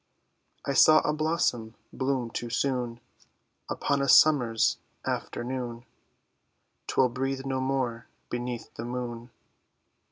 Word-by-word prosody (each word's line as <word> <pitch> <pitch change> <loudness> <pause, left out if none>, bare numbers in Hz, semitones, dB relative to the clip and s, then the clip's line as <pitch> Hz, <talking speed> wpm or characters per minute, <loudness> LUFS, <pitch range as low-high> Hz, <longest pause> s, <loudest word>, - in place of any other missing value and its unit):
I 140 - 0
saw 155 +3 +7
a 150 - 0
blossom 150 -8 0 0.2
bloom 130 -3 -1
too 120 - -4
soon 125 -1 -1 0.7
Upon 140 -1 0
a 140 - 0
summer's 125 -7 +5 0.3
afternoon; 120 -1 -4 1.0
'Twill 130 -1 +3
breathe 135 +2 -3
no 135 -1 -1
more 130 -3 -2 0.2
beneath 120 -1 -4
the 115 - -6
moon. 120 -1 -5
125 Hz, 105 wpm, -28 LUFS, 120-135 Hz, 1.0 s, saw